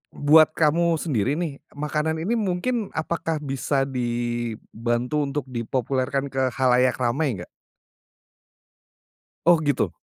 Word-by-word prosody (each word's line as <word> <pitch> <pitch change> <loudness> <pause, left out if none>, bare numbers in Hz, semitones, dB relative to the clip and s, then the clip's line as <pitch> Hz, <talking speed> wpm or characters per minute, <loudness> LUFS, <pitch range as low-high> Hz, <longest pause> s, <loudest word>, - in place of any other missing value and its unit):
buat 155 +2 +6
kamu 165 +2 +3
sendiri 140 - 0
nih 160 -5 -3 0.2
makanan 150 +2 -1
ini 220 - 0
mungkin 210 +3 -1
apakah 160 -1 -2
bisa 135 0 0
di 120 -3 -2 0.2
bantu 120 +6 -1
untuk 140 +1 -2
dipopulerkan 130 +3 -1
ke 130 -1 +1
khalayak 125 -1 +3
ramai 130 0 +1
enggak? 90 - -8 2.0
Oh 170 -1 +6
gitu? 145 -2 0
140 Hz, 115 wpm, -24 LUFS, 125-160 Hz, 2.0 s, buat